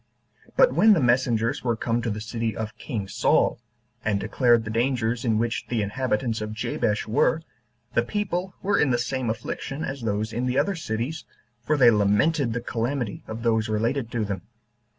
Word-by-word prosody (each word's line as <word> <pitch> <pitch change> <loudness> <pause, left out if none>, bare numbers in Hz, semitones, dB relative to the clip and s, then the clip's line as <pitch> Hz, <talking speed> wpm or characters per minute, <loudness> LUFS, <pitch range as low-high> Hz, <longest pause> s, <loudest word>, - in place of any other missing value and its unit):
But - - +6
when 220 -1 +6
the 185 - +3
messengers 125 0 +2
were 120 -2 +1
come 115 +1 -1
to 115 - -2
the 105 0 -3
city 115 -1 -3
of 110 -1 -4
king 110 -8 -4
Saul, - - +2 0.4
and 105 -2 +1
declared 120 +2 +3
the 110 - -5
dangers 120 0 0
in 115 -4 +2
which 115 +1 -1
the 115 -3 0
inhabitants 115 +1 -1
of 105 0 -4
Jabesh 105 -1 -1
were, 145 +7 +2 0.5
the - - +4
people 185 - -2
were 200 +1 +2
in 145 - +3
the 120 - +2
same 120 0 -2
affliction 135 +6 -4
as 135 0 -5
those 110 0 -2
in 120 +3 -1
the 125 +1 0
other 200 - +2
cities, 150 +1 -3 0.4
for 150 +5 +1
they 125 -4 +7
lamented 110 +6 +2
the 115 - -2
calamity 120 -1 -2
of 110 +1 -6
those 110 -2 +1
related 115 +3 0
to 115 -3 0
them. 100 -3 -4
115 Hz, 185 wpm, -25 LUFS, 110-130 Hz, 0.5 s, they